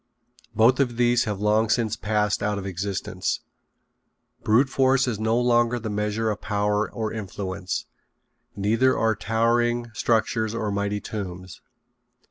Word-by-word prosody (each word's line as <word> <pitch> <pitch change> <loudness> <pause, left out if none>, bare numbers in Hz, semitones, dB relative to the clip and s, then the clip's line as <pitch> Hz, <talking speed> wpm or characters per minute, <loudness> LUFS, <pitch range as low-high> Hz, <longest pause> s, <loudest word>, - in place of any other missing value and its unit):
Both 115 +5 +4
of 120 -4 +1
these 120 0 +3
have 105 -3 -3
long 105 +2 +2
since 110 -2 +1
passed 105 0 0
out 105 0 0
of 100 - -5
existence. 95 -1 -3 1.0
Brute 115 +6 +4
force 135 0 +2
is 110 -4 -2
no 110 +2 +1
longer 120 0 +2
the 110 -2 -4
measure 105 +2 -1
of 105 - -5
power 105 0 0
or 110 -2 -3
influence. 95 -3 -4 0.7
Neither 110 +6 +2
are 110 0 +2
towering 120 +2 +1
structures 110 0 0
or 110 -2 -2
mighty 100 +1 -1
tombs. 95 -3 -7
110 Hz, 135 wpm, -24 LUFS, 105-120 Hz, 1.0 s, Both